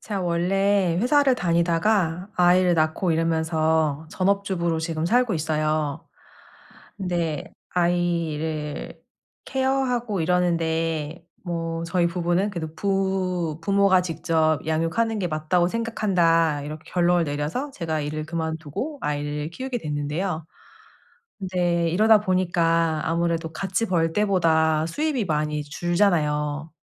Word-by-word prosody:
제가 205 -3 -4
원래 180 +1 +1
회사를 270 +2 +4
다니다가 170 0 +1
아이를 180 0 +4
낳고 160 +2 +1
이러면서 160 -2 +1
전업주부로 185 -4 0
지금 160 -1 -2
살고 240 +1 +2
있어요. 155 0 -1 0.9
근데 170 -5 -2 0.2
아이를 165 -4 -1 0.4
케어하고 255 -6 0
이러는데 165 -2 0 0.2
뭐 165 -2 -3
저희 170 0 +1
부부는 175 +3 0
그래도 160 -4 -5
부 185 -4 -1
"부모가 200 -1 +4
직접 160 -2 0
양육하는 165 +8 0
게 180 - -1
맞다고 160 +3 +1
생각한다." 175 -8 +1
이렇게 155 +2 -8
결론을 175 -1 +3
내려서 150 - -3
제가 165 - -3
일을 155 +1 -4
그만두고 160 - -4
아이를 150 +1 -2
키우게 255 +6 -4
됐는데요. 155 +2 -3 0.9
근데 175 -3 0
이러다 215 +5 +5
보니까 170 -4 +1
아무래도 165 0 -1
같이 195 +6 -1
벌 165 -4 +1
때보다 160 -6 +2
수입이 265 - -1
많이 150 -1 -1
줄잖아요. 155 -2 0
170 Hz, 280 characters per minute, -24 LUFS, 160-190 Hz, 0.9 s, 이러다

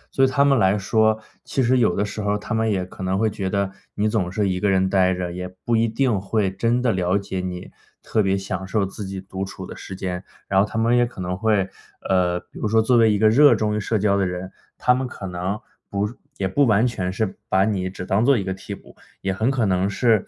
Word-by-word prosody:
对 135 0 +5
他 140 +2 +3
们 140 -1 +4
来 95 -1 +3
说， 110 +2 +2 0.2
其 135 - -1
实 125 +1 +3
有 110 -7 +3
的 100 - +1
时 105 +1 -5
候， 105 0 0
他 105 - -5
们 110 0 +1
也 95 -3 0
可 95 - -12
能 95 +1 0
会 110 +2 +2
觉 95 -2 -3
得 100 0 0 0.2
你 105 +1 +1
总 105 -5 0
是 105 0 0
一 90 -1 -1
个 105 - +1
人 95 -1 +3
呆 95 -1 +3
着， 90 -1 -3
也 90 +1 -5 0.2
不 120 - +2
一 115 +1 +3
定 115 -3 +1
会 100 0 0
真 115 +5 +1
的 125 - +2
了 90 -1 +1
解 100 -2 -4
你 90 -1 -6 0.3
特 110 - +1
别 95 -1 +1
享 95 0 -4
受 100 +1 +1
自 100 +2 -7
己 95 0 -5
独 95 0 -6
处 95 -1 -8
的 - - -9
时 95 - -8
间。 90 -1 -4 0.2
然 95 - +3
后 105 - +1
他 110 - -6
们 115 +2 +3
也 120 0 +3
可 120 - -13
能 90 0 -2
会， 105 -1 +1 0.4
呃， 90 -2 +2
比 - - -14
如 - - -1
说 110 +1 +3
作 120 +2 +3
为 115 -2 +5
一 105 - +2
个 110 +1 +5
热 145 +6 +6
衷 105 -1 0
于 - - 0
社 110 +2 0
交 100 -1 +2
的 100 -2 +1
人， 90 +1 -5 0.3
他 125 - +3
们 130 0 -1
可 105 - -8
能 90 +3 -3 0.3
不 100 +1 -1 0.3
也 95 - 0
不 140 +10 +3
完 110 +1 +4
全 95 -7 -1
是 95 +1 -2
把 95 +1 +3
你 95 -4 -1
只 95 -1 -7
当 100 +4 +2
作 140 -2 +5
一 100 - -1
个 95 - -2
替 95 +2 -7
补， - - -17 0.3
也 95 - -1
很 110 +6 0
可 130 -4 +1
能 95 0 +1
是， 110 0 +2
100 Hz, 280 characters per minute, -22 LUFS, 95-110 Hz, 0.4 s, 热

